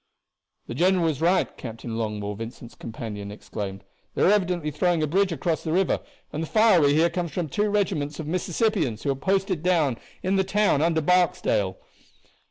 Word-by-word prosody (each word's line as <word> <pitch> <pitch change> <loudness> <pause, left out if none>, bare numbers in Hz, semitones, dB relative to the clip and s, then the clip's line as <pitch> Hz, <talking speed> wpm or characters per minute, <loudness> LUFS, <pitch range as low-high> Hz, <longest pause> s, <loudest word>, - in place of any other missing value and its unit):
"The - - -6
general 180 +5 +2
was 155 -3 -1
right," 180 +3 +2
Captain 115 -1 -6
Longmore, 105 -2 -3
Vincent's 115 +2 -8
companion, 110 -3 -7
exclaimed. 100 -1 -6 0.3
"They - - +1
are 190 - +6
evidently 180 -6 +1
throwing 165 +2 +1
a - - +3
bridge 190 +5 +1
across 165 0 -1
the 160 - -2
river, 185 +2 +2 0.3
and 155 - -2
the 165 - -3
fire 215 -4 +5
we 145 0 +4
hear 165 +2 +4
comes 170 -1 -3
from 175 -4 -2
two 210 +8 0
regiments 170 -8 -1
of 160 - -4
Mississippians 175 - 0
who 140 - +1
are - - -1
posted 190 +2 0
down 160 -9 +1 0.2
in 190 +1 +1
the 190 - +3
town 195 -5 +2
under 160 0 +2
Barksdale." 180 - +2
165 Hz, 180 wpm, -25 LUFS, 130-185 Hz, 0.3 s, are